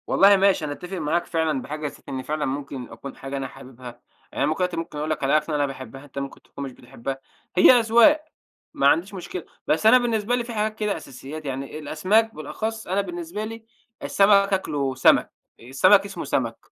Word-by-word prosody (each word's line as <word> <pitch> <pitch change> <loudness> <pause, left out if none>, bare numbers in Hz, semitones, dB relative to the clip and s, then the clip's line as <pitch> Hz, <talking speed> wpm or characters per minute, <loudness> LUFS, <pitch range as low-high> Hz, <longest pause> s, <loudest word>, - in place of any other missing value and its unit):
والله 200 +1 +6
ماشي 195 -4 +3
أنا 145 - -3
أتفق 180 +5 -7
معاك 165 +1 0
فعلًا 160 -5 0
بحاجة 150 +3 -6
نسيت 140 - -11
إني 130 -1 -4
فعلًا 150 +2 -2
ممكن 135 -2 -5
أكون 125 +5 -9
حاجة 135 +1 -6
أنا 135 -1 -3
حاببها، 130 -1 -14 0.5
يعني - - -1
أنا - - +4
ممكن 155 +2 0
دلوقتي 180 -2 -1
ممكن 165 -2 -5
أقول 150 +1 -3
لَك 155 -2 -2
علي 140 +3 +4
أكلة 150 0 -2
أنا 145 -1 +2
باحبها 135 0 -8
أنتَ 140 -1 -7
ممكن 140 0 -7
تكون 140 - -9
مش 135 - -5
بتحبها، 125 +1 -7 0.4
هي 185 - +9
أذواق 240 +6 +5 0.5
ما 140 - +1
عنديش 175 +7 +2
مشكلة. 180 -1 -6 0.2
بس 160 +7 +1
أنا 235 +3 +8
بالنسبة 235 -2 0
لي 245 -1 0
في 235 - -7
حاجات 215 0 -1
كده 210 -1 -1
أساسيات 140 +4 -9
يعني 135 +2 -5
الأسماك 190 +9 +1
بالأخص 220 +9 -5
أنا 190 +3 0
بالنسبة 175 +2 -5
لي 225 +1 -8 0.4
السَمك 200 0 +4
آكله 145 -8 -1
سَمك. 130 - +4 0.3
السَمك 185 - +4
اسمه 200 0 -6
سَمك، - - -2
155 Hz, 200 wpm, -24 LUFS, 140-200 Hz, 0.5 s, هي